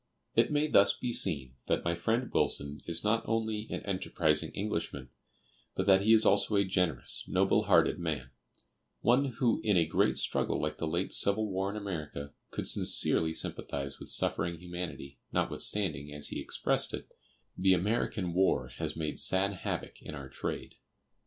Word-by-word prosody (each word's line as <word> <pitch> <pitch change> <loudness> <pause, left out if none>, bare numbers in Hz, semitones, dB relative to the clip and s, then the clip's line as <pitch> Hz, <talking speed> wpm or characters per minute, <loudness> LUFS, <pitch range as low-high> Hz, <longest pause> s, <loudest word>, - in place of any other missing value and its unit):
It - - +2
may 150 0 +2
thus 100 -9 +4
be 125 -1 -3
seen 70 - 0
that - - 0
my 85 - +1
friend 115 +9 -1
Wilson 70 +1 +2
is 85 -1 0
not 110 +2 +2
only 110 -1 -2
"an - - -4
enterprising 80 -5 +2
Englishman," 85 -9 -4 0.7
but 95 - -1
that 95 -1 +5
he 110 +3 +2
is 110 -1 +6
also 100 +1 +3
a 100 0 +3
generous, 90 -8 0
noble - - +2
hearted - - +3
man, 75 -6 -4 0.7
one 125 +4 +3
who 120 0 0
in 105 -4 +2
a 85 - +3
great 80 - +1
struggle - - 0
like 75 0 -3
the 80 - -2
late 85 +4 -1
civil 105 +2 +4
war 95 +1 -1
in 105 - -5
America, 75 -8 -6 0.2
could - - -3
sincerely 80 0 +4
sympathize 70 -3 -5
with - - -9
suffering 85 +1 +1
humanity, 85 -5 -7
notwithstanding, 75 -9 -1
as 75 0 -1
he - - -4
expressed - - 0
it, - - -10 0.5
"the 95 0 +3
American 100 -1 -1
war 95 +2 +1
has 80 -2 -5
made 75 -2 -3
sad 95 +2 +2
havoc 90 - -5
in 75 - -8
our 70 -2 -9
trade." - - -6
90 Hz, 165 wpm, -30 LUFS, 75-105 Hz, 0.7 s, is